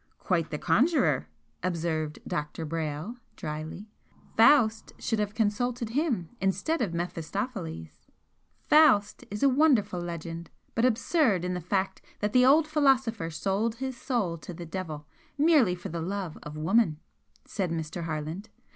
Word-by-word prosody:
"Quite 170 Hz, -4 st, 0 dB
the 150 Hz, -, -3 dB
conjurer!" 170 Hz, -, +2 dB, 0.3 s
observed 160 Hz, -3 st, -2 dB
Dr. 150 Hz, +2 st, -3 dB
Brayle, 160 Hz, +7 st, -4 dB, 0.2 s
drily 155 Hz, +6 st, -6 dB, 0.4 s
"Faust 225 Hz, -2 st, +5 dB
should 225 Hz, -, -1 dB
have 210 Hz, 0 st, -2 dB
consulted 230 Hz, +2 st, 0 dB
him 245 Hz, -, 0 dB
instead 195 Hz, -, 0 dB
of 205 Hz, -7 st, 0 dB
Mephistopheles!" 170 Hz, -, -5 dB, 0.6 s
"'Faust' 265 Hz, -10 st, +5 dB
is 205 Hz, +4 st, -4 dB
a -, -, +7 dB
wonderful 255 Hz, -, +3 dB
legend, 170 Hz, -1 st, -6 dB, 0.2 s
but 230 Hz, -, +2 dB
absurd 235 Hz, -, +2 dB
in 180 Hz, -, -1 dB
the 180 Hz, -, -3 dB
fact 190 Hz, +3 st, -1 dB, 0.2 s
that 210 Hz, 0 st, -1 dB
the 250 Hz, -, +6 dB
old 300 Hz, +4 st, +6 dB
philosopher 265 Hz, -, +2 dB
sold 200 Hz, +7 st, -1 dB
his 260 Hz, +1 st, -4 dB
soul 220 Hz, -, -1 dB
to 175 Hz, -, -8 dB
the 170 Hz, -, -7 dB
Devil, 160 Hz, -3 st, -5 dB, 0.3 s
merely 290 Hz, -, +4 dB
for 175 Hz, -, -7 dB
the 170 Hz, 0 st, -4 dB
love 185 Hz, -1 st, -3 dB
of 150 Hz, +1 st, -8 dB
woman," 160 Hz, 0 st, +2 dB, 0.5 s
said 190 Hz, -4 st, -2 dB
Mr. 165 Hz, +1 st, -4 dB
Harland. 160 Hz, +6 st, -4 dB
195 Hz, 140 wpm, -28 LUFS, 165-235 Hz, 0.6 s, a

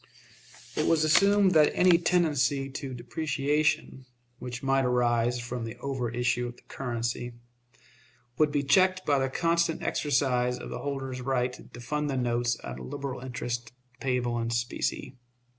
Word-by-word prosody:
It -, -, +1 dB
was 160 Hz, -2 st, +3 dB
assumed 200 Hz, +5 st, +5 dB
that 155 Hz, -3 st, +6 dB
any 180 Hz, -2 st, +5 dB
tendency 145 Hz, -6 st, +1 dB
to 135 Hz, -1 st, -5 dB
depreciation, 145 Hz, +1 st, -1 dB, 0.3 s
which 125 Hz, 0 st, -6 dB
might 135 Hz, 0 st, +2 dB
arise 120 Hz, -1 st, +2 dB
from 120 Hz, 0 st, -5 dB
the 115 Hz, -1 st, -6 dB
over 130 Hz, -3 st, -3 dB
issue 125 Hz, +1 st, 0 dB
of 120 Hz, -, -8 dB
the -, -, -21 dB
currency, 120 Hz, -1 st, -4 dB, 1.1 s
would 155 Hz, -1 st, +4 dB
be 145 Hz, -1 st, 0 dB
checked 185 Hz, +5 st, +3 dB
by 140 Hz, -2 st, +3 dB
the 135 Hz, 0 st, 0 dB
constant 170 Hz, +2 st, +1 dB
exercise 125 Hz, -4 st, +1 dB
of -, -, -8 dB
the -, -, -4 dB
holder's 135 Hz, -2 st, -4 dB
right 125 Hz, -1 st, 0 dB, 0.2 s
to 120 Hz, -, -10 dB
fund 150 Hz, +5 st, -2 dB
the 135 Hz, -, -1 dB
notes 120 Hz, -1 st, 0 dB
at 65 Hz, 0 st, -6 dB
a -, -, -8 dB
liberal 130 Hz, -, -5 dB
interest, 120 Hz, -2 st, -4 dB, 0.3 s
payable 125 Hz, -2 st, 0 dB
in 115 Hz, 0 st, -2 dB
specie. 120 Hz, +2 st, -2 dB
130 Hz, 155 wpm, -28 LUFS, 120-150 Hz, 1.1 s, that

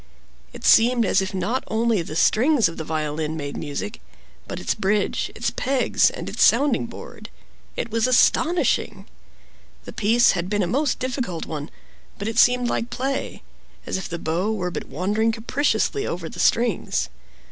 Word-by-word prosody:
It -, -, -12 dB
seemed 235 Hz, 0 st, +5 dB
as 195 Hz, -, +2 dB
if 190 Hz, -, -3 dB
not 195 Hz, +7 st, -2 dB
only 225 Hz, -2 st, +1 dB
the 160 Hz, -2 st, -7 dB
strings 240 Hz, -, +3 dB
of 165 Hz, -, -8 dB
the 160 Hz, -, -4 dB
violin 155 Hz, 0 st, -3 dB
made 145 Hz, -2 st, -5 dB
music, 160 Hz, +9 st, -5 dB, 0.5 s
but -, -, -5 dB
its -, -, -1 dB
bridge, 205 Hz, 0 st, 0 dB
its -, -, -1 dB
pegs, 265 Hz, -1 st, +2 dB
and -, -, -7 dB
its -, -, +1 dB
sounding 275 Hz, -4 st, +3 dB
board. 230 Hz, -, -10 dB, 0.5 s
It 230 Hz, -, -4 dB
was 230 Hz, +2 st, +1 dB
astonishing! 325 Hz, +7 st, +2 dB, 0.8 s
The -, -, -8 dB
piece 230 Hz, +2 st, +4 dB
had 180 Hz, -1 st, -3 dB
been 205 Hz, -1 st, +1 dB
a -, -, +1 dB
most 265 Hz, -, 0 dB
difficult 245 Hz, -, -3 dB
one; 150 Hz, -1 st, -6 dB, 0.5 s
but 200 Hz, -, -4 dB
it 225 Hz, +1 st, 0 dB
seemed 245 Hz, 0 st, +4 dB
like 235 Hz, 0 st, -2 dB
play—as 270 Hz, +2 st, -5 dB
if 190 Hz, -, -4 dB
the 170 Hz, -, -4 dB
bow 170 Hz, +6 st, -1 dB
were 180 Hz, -5 st, -2 dB
but -, -, -5 dB
wandering 210 Hz, +7 st, 0 dB
capriciously 280 Hz, -, 0 dB
over 170 Hz, -1 st, -4 dB
the -, -, -9 dB
strings. 230 Hz, -4 st, +1 dB
220 Hz, 165 wpm, -23 LUFS, 175-245 Hz, 0.8 s, seemed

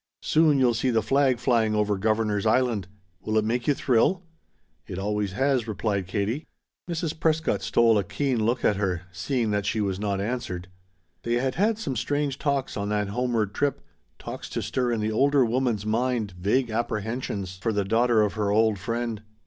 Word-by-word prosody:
"Soon 155 Hz, -2 st, +4 dB
you'll 125 Hz, -3 st, +4 dB
see 120 Hz, +3 st, 0 dB
the 115 Hz, -3 st, +2 dB
flag 135 Hz, -2 st, +3 dB
flying 115 Hz, -3 st, +2 dB
over 105 Hz, -1 st, +1 dB
Governor's 110 Hz, 0 st, 0 dB
Island. 110 Hz, -5 st, +1 dB, 0.3 s
Will 110 Hz, 0 st, -1 dB
it 110 Hz, -, +2 dB
make 120 Hz, +2 st, -1 dB
you 145 Hz, -, +3 dB
thrill?" 135 Hz, +11 st, +2 dB, 0.6 s
"It 90 Hz, -, -6 dB
always 105 Hz, 0 st, -1 dB
has," 130 Hz, 0 st, +1 dB
replied 100 Hz, -3 st, -2 dB
Katie. 105 Hz, -, -2 dB, 0.4 s
Mrs. 165 Hz, -2 st, -3 dB
Prescott 160 Hz, 0 st, +1 dB
stole 115 Hz, -2 st, +3 dB
a -, -, 0 dB
keen 110 Hz, +5 st, -1 dB
look 120 Hz, +3 st, 0 dB
at 105 Hz, -, +3 dB
her, 90 Hz, -3 st, -1 dB
seeing 110 Hz, +5 st, -1 dB
that 105 Hz, -1 st, -1 dB
she 110 Hz, -, 0 dB
was 100 Hz, -2 st, -1 dB
not 100 Hz, -2 st, -1 dB
answered. 100 Hz, -5 st, -4 dB, 0.5 s
They 120 Hz, -, -2 dB
had 130 Hz, +1 st, 0 dB
had 210 Hz, +4 st, +1 dB
some 155 Hz, -12 st, -3 dB
strange 145 Hz, +3 st, -1 dB
talks 140 Hz, -2 st, -1 dB
on 100 Hz, 0 st, -2 dB
that 105 Hz, -1 st, 0 dB
homeward 115 Hz, -2 st, -1 dB
trip, 140 Hz, -3 st, 0 dB, 0.4 s
talks -, -, -7 dB
to -, -, -3 dB
stir 125 Hz, -2 st, -1 dB
in 115 Hz, -2 st, -1 dB
the 110 Hz, +1 st, 0 dB
older 140 Hz, +3 st, +3 dB
woman's 120 Hz, -3 st, 0 dB
mind 115 Hz, -1 st, 0 dB
vague 105 Hz, +8 st, 0 dB
apprehensions 110 Hz, -4 st, -3 dB
for 105 Hz, +5 st, -1 dB
the 100 Hz, -2 st, 0 dB
daughter 115 Hz, +1 st, +3 dB
of 105 Hz, -, 0 dB
her 105 Hz, -2 st, -1 dB
old 110 Hz, 0 st, +3 dB
friend. 115 Hz, 0 st, -3 dB
115 Hz, 185 wpm, -26 LUFS, 105-130 Hz, 0.6 s, Soon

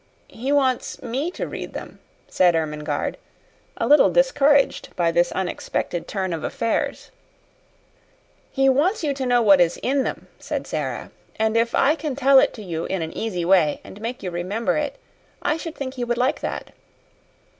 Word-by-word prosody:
"He 255 Hz, +5 st, -3 dB
wants 265 Hz, -3 st, +1 dB
me 260 Hz, +7 st, -2 dB
to 360 Hz, -, -5 dB
read -, -, -7 dB
them," -, -, -8 dB, 0.3 s
said 180 Hz, -2 st, +3 dB
Ermengarde, 150 Hz, -2 st, -2 dB, 0.6 s
a -, -, 0 dB
little 295 Hz, -, +6 dB
discouraged 290 Hz, -, +3 dB
by 170 Hz, -2 st, +2 dB
this 175 Hz, +1 st, +2 dB
unexpected 175 Hz, -2 st, -3 dB
turn 190 Hz, -3 st, -2 dB
of 160 Hz, -1 st, -4 dB
affairs. 230 Hz, -5 st, -2 dB, 1.4 s
"He 270 Hz, -1 st, +2 dB
wants 300 Hz, +10 st, +2 dB
you 290 Hz, -2 st, +1 dB
to 265 Hz, -2 st, -3 dB
know 245 Hz, -1 st, +3 dB
what 195 Hz, -4 st, +6 dB
is 170 Hz, -1 st, +2 dB
in 275 Hz, +2 st, +2 dB
them," -, -, -4 dB
said -, -, -4 dB
Sara. -, -, -4 dB, 0.2 s
"And 220 Hz, 0 st, 0 dB
if 230 Hz, +1 st, +2 dB
I 285 Hz, -, +4 dB
can 300 Hz, -3 st, -4 dB
tell 275 Hz, 0 st, +6 dB
it -, -, +3 dB
to 220 Hz, -, -9 dB
you 165 Hz, -3 st, -4 dB
in 190 Hz, -3 st, -2 dB
an 160 Hz, -, -7 dB
easy 180 Hz, -6 st, -2 dB
way 175 Hz, -5 st, +3 dB
and 205 Hz, -, -12 dB
make 235 Hz, +1 st, -5 dB
you 180 Hz, -, -3 dB
remember 185 Hz, +4 st, -1 dB
it, 295 Hz, -2 st, -2 dB, 0.5 s
I 300 Hz, -, +1 dB
should 325 Hz, 0 st, -6 dB
think 260 Hz, -2 st, -5 dB
he 250 Hz, -2 st, -4 dB
would 240 Hz, 0 st, -1 dB
like 250 Hz, +1 st, +1 dB
that." -, -, -4 dB
235 Hz, 175 wpm, -23 LUFS, 180-275 Hz, 1.4 s, little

